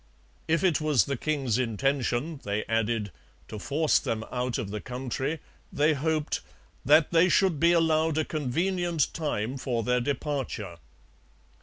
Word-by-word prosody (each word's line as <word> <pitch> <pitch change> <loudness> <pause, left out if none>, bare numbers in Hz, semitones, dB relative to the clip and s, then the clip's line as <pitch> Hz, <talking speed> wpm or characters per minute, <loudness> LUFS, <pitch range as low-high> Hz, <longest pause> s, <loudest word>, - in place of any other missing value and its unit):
If 165 +3 +1
it 175 -5 +2
was 150 -5 +3
the 140 - -2
king's 135 -4 -1
intention, 130 +4 -1
they 105 +1 -2
added, 115 -2 0 0.4
to 110 - -6
force 150 +7 +2
them 110 0 -3
out 125 0 -1
of 100 - -4
the 105 0 -4
country, 130 +4 -3 0.3
they 150 +2 +3
hoped 155 +1 -1 0.4
'that 150 +3 +5
they 170 +2 +5
should 185 -7 +3
be 170 +2 +5
allowed 160 -2 +2
a 155 - +1
convenient 165 +3 -1
time 135 -6 -2
for 120 -3 -2
their 125 +2 +1
departure.' 130 - -3
140 Hz, 145 wpm, -27 LUFS, 120-160 Hz, 0.4 s, that